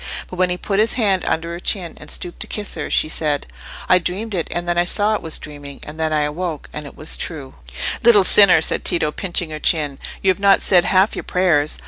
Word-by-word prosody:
But 180 Hz, -, -7 dB
when 185 Hz, 0 st, +2 dB
he 180 Hz, -, -1 dB
put 195 Hz, +2 st, -2 dB
his 220 Hz, +2 st, +3 dB
hand 200 Hz, -6 st, +1 dB
under 170 Hz, +1 st, -2 dB
her 170 Hz, -, -6 dB
chin, 180 Hz, -2 st, -1 dB
and 150 Hz, -, -12 dB
stooped 175 Hz, -, -6 dB
to -, -, -5 dB
kiss 210 Hz, -1 st, -4 dB
her, 155 Hz, -, -4 dB
she -, -, +3 dB
said— 150 Hz, -2 st, -1 dB, 0.4 s
"I 185 Hz, -, +5 dB
dreamed 200 Hz, +5 st, -4 dB
it, 170 Hz, -4 st, -2 dB
and 175 Hz, 0 st, -4 dB
then 175 Hz, -, 0 dB
I 175 Hz, -, +3 dB
said 205 Hz, +4 st, +2 dB
it -, -, -13 dB
was 160 Hz, -, -1 dB
dreaming—and 145 Hz, +1 st, -10 dB
then 160 Hz, -1 st, -1 dB
I 155 Hz, -1 st, +1 dB
awoke, 155 Hz, +1 st, -4 dB
and 150 Hz, -1 st, -6 dB
it -, -, -14 dB
was 155 Hz, -, -1 dB
true." 140 Hz, -6 st, -6 dB, 0.5 s
"Little 225 Hz, -4 st, +6 dB
sinner!" 190 Hz, -3 st, +6 dB
said -, -, +1 dB
Tito, 155 Hz, -3 st, 0 dB
pinching 175 Hz, -2 st, -2 dB
her 155 Hz, -, -6 dB
chin, 150 Hz, -4 st, 0 dB, 0.2 s
"you 190 Hz, -, +4 dB
have 185 Hz, -, -5 dB
not 200 Hz, 0 st, +4 dB
said 180 Hz, -3 st, +4 dB
half 190 Hz, +2 st, +2 dB
your -, -, -4 dB
prayers. 165 Hz, -5 st, +1 dB
175 Hz, 235 wpm, -19 LUFS, 155-190 Hz, 0.5 s, Little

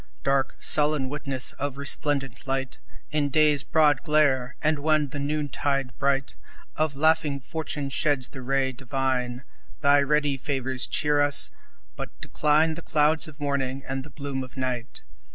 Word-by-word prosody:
Dark, 135 Hz, -1 st, +1 dB
sullen 150 Hz, -3 st, +3 dB
witness 140 Hz, -3 st, -1 dB
of 140 Hz, -1 st, -3 dB
resplendent 140 Hz, -2 st, 0 dB
light 135 Hz, -1 st, -2 dB, 0.3 s
In 150 Hz, -2 st, 0 dB
day's 150 Hz, -1 st, +3 dB
broad 150 Hz, -2 st, +3 dB
glare, 140 Hz, -5 st, +2 dB
and 155 Hz, -1 st, +1 dB
when 155 Hz, 0 st, +2 dB
the 145 Hz, +1 st, -6 dB
noontide 140 Hz, -2 st, -2 dB
bright 135 Hz, -1 st, 0 dB, 0.4 s
Of 155 Hz, -2 st, 0 dB
laughing 155 Hz, -1 st, +3 dB
fortune 145 Hz, 0 st, -5 dB
sheds 140 Hz, -3 st, +1 dB
the 130 Hz, -, -9 dB
ray 135 Hz, +1 st, 0 dB
divine, 130 Hz, -1 st, -2 dB, 0.4 s
Thy 140 Hz, 0 st, +5 dB
ready 145 Hz, -1 st, +1 dB
favors 130 Hz, -2 st, 0 dB
cheer 150 Hz, -1 st, +1 dB
us 145 Hz, 0 st, +2 dB, 0.4 s
but -, -, -8 dB
decline 155 Hz, +2 st, +2 dB
The 165 Hz, -, -7 dB
clouds 155 Hz, 0 st, +2 dB
of 155 Hz, -1 st, -13 dB
morning 135 Hz, -2 st, -2 dB
and 135 Hz, 0 st, -3 dB
the 150 Hz, -, -12 dB
gloom 140 Hz, -2 st, -5 dB
of 130 Hz, +1 st, -13 dB
night. 125 Hz, -2 st, -4 dB
140 Hz, 150 wpm, -25 LUFS, 135-150 Hz, 0.4 s, Thy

